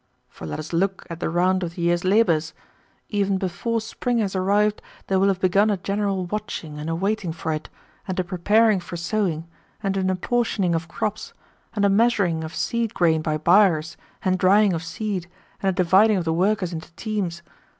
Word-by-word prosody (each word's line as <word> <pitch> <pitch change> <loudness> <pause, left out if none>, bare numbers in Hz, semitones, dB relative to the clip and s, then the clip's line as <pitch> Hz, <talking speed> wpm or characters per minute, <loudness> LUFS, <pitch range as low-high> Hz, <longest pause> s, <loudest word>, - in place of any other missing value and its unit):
For 80 - -9
let 75 - -4
us 155 +2 -7
look 190 +3 0
at 165 - -6
the - - -1
round 185 +2 +2
of 170 -1 -4
the 170 - -4
year's 175 0 +2
labours. 185 -6 +2 0.5
Even 200 -2 +1
before 190 +5 -2
spring 235 +2 -2
has 200 -4 -1
arrived 205 +3 +2 0.2
there 190 -1 +1
will 195 - +4
have 195 -2 +1
begun 195 +3 +3
a 205 - +1
general 195 0 -1
watching 175 -6 -5
and 150 +2 -4
a 165 - -1
waiting 195 0 -1
for 160 0 -3
it, 155 0 -5 0.4
and 185 -1 -2
a - - +2
preparing 205 +4 +3
for 175 0 -7
sowing, 170 -3 -1 0.4
and 195 -1 0
an 190 -1 +1
apportioning 195 -1 0
of 165 0 -2
crops, 210 +4 -4 0.4
and 205 -1 +2
a - - +4
measuring 195 -6 +2
of 160 +3 -7
seed 235 -2 -1
grain 160 -3 +3
by 155 -1 -1
byres, 165 -2 +3 0.3
and 185 -1 +1
drying 200 +2 +4
of 165 - -2
seed, 190 0 -4 0.3
and 195 - +2
a - - +3
dividing 190 +4 +4
of 175 - -2
the 160 - +1
workers 185 +1 +1
into 160 0 -7
teams. 185 -5 -3
185 Hz, 195 wpm, -23 LUFS, 170-205 Hz, 0.5 s, will